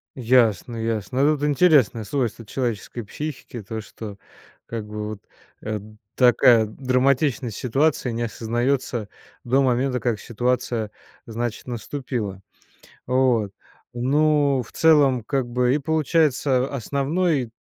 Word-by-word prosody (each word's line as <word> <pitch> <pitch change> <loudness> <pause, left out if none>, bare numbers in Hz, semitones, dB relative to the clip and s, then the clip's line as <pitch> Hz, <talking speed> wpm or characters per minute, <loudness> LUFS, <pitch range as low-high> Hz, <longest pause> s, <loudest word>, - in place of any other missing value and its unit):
Ясно, 120 -3 +2
ясно. 115 +3 -1
Ну 150 0 +3
тут 145 - -2
интересное 145 - +4
свойство 115 -2 -2
человеческой 120 -1 -3
психики 140 0 -7
то, 110 +2 -6
что 105 0 -9 0.5
как 115 -2 -5
бы 105 0 -5
вот, 110 - -6 0.4
э, 110 -1 -3 0.4
такая 120 -2 +5
драматичность 130 0 0
ситуации 135 0 +1
не 115 +1 -2
осознается 120 0 -1 0.4
до 130 +3 +2
момента, 125 0 +1
как 115 -4 -1
ситуация, 120 -1 -1 0.3
значит, 115 +1 -4
наступила. 120 -4 -4 0.7
Вот, 125 -5 +2 0.4
ну 140 +1 +2
в - - -17
целом 145 -6 +4
как 130 +2 -1
бы 125 +2 +1
и - - +2
получается 150 -3 +1
основной 140 - 0
125 Hz, 115 wpm, -23 LUFS, 115-140 Hz, 0.7 s, такая